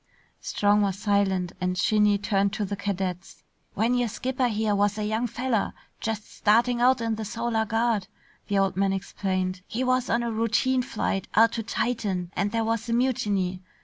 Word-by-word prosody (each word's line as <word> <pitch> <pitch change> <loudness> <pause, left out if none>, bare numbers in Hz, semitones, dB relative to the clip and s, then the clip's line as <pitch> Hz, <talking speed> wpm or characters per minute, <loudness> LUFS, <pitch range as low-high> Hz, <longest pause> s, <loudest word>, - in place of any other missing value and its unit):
Strong 205 0 +2
was 195 -2 0
silent 195 -3 +1
and 180 0 -1
Shinny 210 +2 +3
turned 200 0 0
to 210 - -1
the 200 +1 -3
cadets. 190 -2 -4 0.3
"When 225 +4 +2
your 245 -1 +1
skipper 255 +3 -1
here 215 -2 0
was 205 +1 +1
a 210 - -2
young 220 +3 0
feller 240 -2 -1 0.3
just 215 -1 -3
starting 235 +3 +2
out 255 0 +4
in 225 -1 0
the 220 0 -4
Solar 230 +1 -1
Guard," 225 -3 0 0.4
the 200 - 0
old 195 -2 +2
man 195 0 +1
explained, 185 -1 -2
"he 245 +3 -2
was 255 -1 +1
on 235 +1 +1
a 235 - -2
routine 230 +4 +1
flight 200 -5 -2
out 225 +1 +6
to 230 - -3
Titan 205 -6 -2
and 200 +1 0
there 230 0 0
was 230 +1 -1
a - - +1
mutiny. 205 -7 0
210 Hz, 180 wpm, -26 LUFS, 195-230 Hz, 0.4 s, out